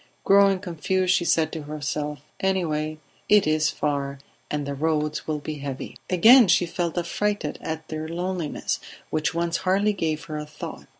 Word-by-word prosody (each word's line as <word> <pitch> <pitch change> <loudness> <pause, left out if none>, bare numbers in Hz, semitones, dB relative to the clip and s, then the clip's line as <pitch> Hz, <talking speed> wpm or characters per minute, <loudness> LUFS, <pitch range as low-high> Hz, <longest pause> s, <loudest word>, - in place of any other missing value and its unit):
Growing 195 0 +5
confused, 185 0 0
she 175 - +2
said 165 -1 +2
to 160 - -5
herself 150 -1 -4 0.2
"Anyway 155 -5 0 0.3
it 210 -1 +6
is 155 0 +2
far, 140 -2 -2 0.3
and 150 -1 -2
the 140 - -3
roads 150 +1 -1
will 155 -1 0
be 150 0 -6
heavy." 140 -2 -6
Again 225 +6 +7
she 180 0 +4
felt 170 0 -3
affrighted 175 -1 -1
at 160 0 -5
their 155 0 -4
loneliness, 175 -1 -2 0.3
which 155 +1 0
once 170 0 0
hardly 200 +3 +2
gave 160 -4 -2
her 155 -2 -5
a 150 - -5
thought. 150 - -8
160 Hz, 165 wpm, -25 LUFS, 150-185 Hz, 0.3 s, Again